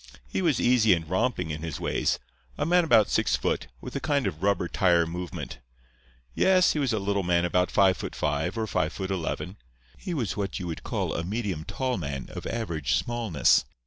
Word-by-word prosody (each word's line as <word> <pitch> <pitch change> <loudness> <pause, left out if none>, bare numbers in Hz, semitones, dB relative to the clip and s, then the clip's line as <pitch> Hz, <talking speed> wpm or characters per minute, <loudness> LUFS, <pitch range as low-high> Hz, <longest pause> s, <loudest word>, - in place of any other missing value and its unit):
He - - -2
was 160 -9 +2
easy 115 -5 +5
and 80 -2 -6
romping 90 -1 0
in 75 0 -5
his 85 -1 -5
ways; - - 0 0.4
a - - 0
man 175 +2 +4
about 115 -10 +5
six - - +2
foot, 60 - -1
with - - -8
a - - 0
kind 140 -2 0
of 75 - -3
rubber 100 -3 +1
tire 85 -2 +3
movement. 85 -6 -6 0.7
Yes, 185 - +4
he 150 - -1
was 135 -3 +1
a 110 - +1
little 100 0 0
man 85 -1 +2
about 90 +1 +1
five 95 -2 +4
foot - - -6
five, 80 +7 -1
or 110 - 0
five 80 -6 -1
foot 95 0 -4
eleven. 90 0 -3 0.4
He 180 - -4
was 115 - -1
what 100 -3 -3
you 90 - -5
would 85 -2 -5
call - - -2
a 80 - -2
medium 95 -4 -3
tall 130 -5 -2
man 70 -5 -5
of - - -6
average 80 - -1
smallness. 115 - +2
95 Hz, 205 wpm, -27 LUFS, 85-115 Hz, 0.7 s, easy